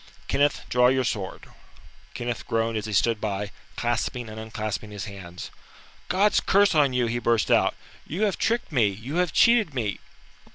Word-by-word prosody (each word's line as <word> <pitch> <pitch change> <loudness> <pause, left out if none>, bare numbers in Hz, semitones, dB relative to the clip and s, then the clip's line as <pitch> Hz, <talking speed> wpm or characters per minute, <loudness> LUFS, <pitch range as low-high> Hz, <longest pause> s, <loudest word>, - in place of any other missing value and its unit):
Kenneth, 145 0 +2
draw 125 0 +4
your 130 +1 +2
sword." 100 -5 -4 0.7
Kenneth 120 -1 -4
groaned 115 0 0
as 110 0 -3
he - - -5
stood 105 +2 +2
by, 100 -1 -3 0.2
clasping 120 0 -2
and 110 +1 -8
unclasping 110 -1 -4
his 105 -1 -6
hands. 95 -4 -9 0.6
"God's 200 +3 +3
curse 200 0 +3
on 145 -4 +4
you," 125 -1 +1
he 120 +1 -1
burst 115 -1 +1
out. - - +3 0.3
"You 185 +7 -2
have 205 -3 0
tricked 235 -4 0
me, 120 -8 +3
you 110 - -5
have 180 -3 +1
cheated 220 - +4
me." 110 -5 -2
120 Hz, 170 wpm, -25 LUFS, 110-145 Hz, 0.7 s, draw